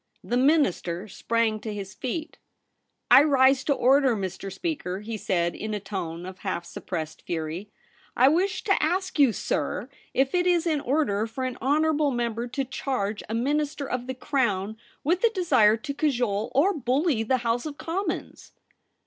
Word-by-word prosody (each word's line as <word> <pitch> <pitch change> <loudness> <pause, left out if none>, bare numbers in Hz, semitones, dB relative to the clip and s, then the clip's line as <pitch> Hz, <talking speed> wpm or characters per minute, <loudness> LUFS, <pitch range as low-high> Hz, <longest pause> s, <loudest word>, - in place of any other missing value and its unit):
The 240 - -2
Minister 245 - +2
sprang 225 +1 0
to 220 - -5
his 195 -2 -6
feet. 310 - -5 0.4
' - - -40
I - - +10
rise 270 -2 +4
to 285 - +3
order, 265 -1 +4
Mr. 195 0 -5
Speaker,' 245 - -3
he 225 +1 -5
said, 175 -4 0
in 215 0 -4
a - - -2
tone 180 -4 -5
of 185 0 -9
half 180 -3 -3
suppressed 160 -4 -6
fury; 165 +4 -4 0.2
' - - -24
I 255 - +6
wish 365 +5 +1
to 425 - -1
19^ - - +6
THE - - -1
REBEL - - +2
ROSE. 355 - +3
ask 370 -4 -7
you, 275 -4 +6
sir, - - -2 0.3
if 270 0 +2
it 360 0 +2
is 350 -1 +3
in 310 -4 +1
order 240 -7 +1
for 245 +4 -5
an 255 -1 -3
honourable 300 +2 +2
member 240 -2 -2
to 270 +2 -3
charge 230 -5 -2
a 225 - -2
Minister 285 +3 -1
of 250 0 -3
the 260 - -4
Crown 220 -7 -1 0.3
with 345 - +1
a 465 - +6
desire 260 - +4
to 280 +5 -5
cajole 245 -8 0
or 350 +9 +4
bully 275 - +1
the 255 +4 +1
House 235 +5 0
of 290 -1 -7
Commons 350 +1 -4
255 Hz, 190 wpm, -26 LUFS, 210-300 Hz, 0.4 s, I